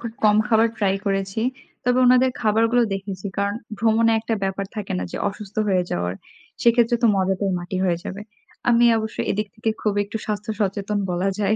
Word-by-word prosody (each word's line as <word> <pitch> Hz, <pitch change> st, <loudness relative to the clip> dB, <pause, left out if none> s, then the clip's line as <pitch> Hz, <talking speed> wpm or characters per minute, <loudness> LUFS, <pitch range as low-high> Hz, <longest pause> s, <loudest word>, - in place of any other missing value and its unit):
খুব 235 Hz, -1 st, -5 dB
কম 210 Hz, 0 st, +5 dB
খাবার 225 Hz, 0 st, +4 dB
ট্রাই 195 Hz, -2 st, +2 dB
করেছি। 195 Hz, +1 st, -1 dB, 0.4 s
তবে 250 Hz, +1 st, +2 dB
ওনাদের 255 Hz, +1 st, +5 dB
খাবারগুলো 225 Hz, +2 st, +3 dB
দেখেছি। 195 Hz, 0 st, -5 dB
কারণ 200 Hz, 0 st, 0 dB, 0.2 s
ভ্রমণে 225 Hz, 0 st, +3 dB
একটা 225 Hz, 0 st, -2 dB
ব্যাপার 195 Hz, 0 st, -2 dB
থাকে 210 Hz, -2 st, -4 dB
না? 90 Hz, -, -2 dB
যে -, -, -4 dB
অসুস্থ 205 Hz, 0 st, -10 dB
হয়ে 185 Hz, -2 st, +3 dB
যাওয়ার, 90 Hz, +1 st, -1 dB, 0.5 s
সেক্ষেত্রে 235 Hz, 0 st, +4 dB
তো -, -, +6 dB
মজাটাই 195 Hz, +1 st, 0 dB
মাটি 175 Hz, +2 st, -5 dB
হয়ে 175 Hz, -2 st, +2 dB
যাবে। 200 Hz, +2 st, -6 dB, 0.5 s
আমি 240 Hz, 0 st, +5 dB
অবশ্য 220 Hz, -1 st, -5 dB
এদিক 210 Hz, +1 st, -1 dB
থেকে 220 Hz, 0 st, -1 dB
খুব 210 Hz, -2 st, +1 dB
একটু 205 Hz, +2 st, -6 dB
স্বাস্থ্য 210 Hz, 0 st, -3 dB
সচেতন 200 Hz, +1 st, -1 dB
বলা 180 Hz, +2 st, 0 dB
যায় 205 Hz, 0 st, +2 dB
210 Hz, 180 wpm, -22 LUFS, 195-225 Hz, 0.5 s, তো